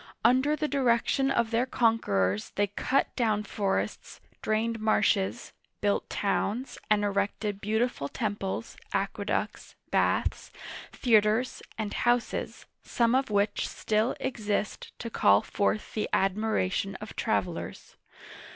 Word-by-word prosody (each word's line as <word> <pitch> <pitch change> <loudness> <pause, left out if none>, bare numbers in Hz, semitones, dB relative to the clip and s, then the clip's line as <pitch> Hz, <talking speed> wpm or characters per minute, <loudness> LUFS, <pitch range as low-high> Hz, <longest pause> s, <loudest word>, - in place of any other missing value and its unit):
Under 260 +4 +4
the 305 0 -1
direction 270 0 +2
of 235 -4 +1
their 235 +3 +1
conquerors 105 - +1
they 205 - +3
cut 205 +7 0
down 215 -4 +1
forests, 200 -1 -2 0.2
drained 225 +1 0
marshes, 215 0 +1 0.3
built 205 -1 0
towns, 215 +5 -1
and 210 -1 +3
erected 200 0 -1
beautiful 220 - 0
tem 210 - -2
ples, 195 +3 -5 0.2
aqueducts, - - -2 0.2
baths, - - +1 0.4
theaters, 220 0 +2 0.2
and 215 -2 -3
houses, 240 0 0 0.2
some 235 0 +1
of 265 0 +2
which 205 0 +1
still 215 +3 0
exist 210 -5 -2
to 230 - -6
call 100 - +4
forth 205 +1 -1
the 215 - -2
admiration 195 - +1
of - - -9
travelers. - - -2
215 Hz, 115 wpm, -28 LUFS, 205-240 Hz, 0.4 s, Under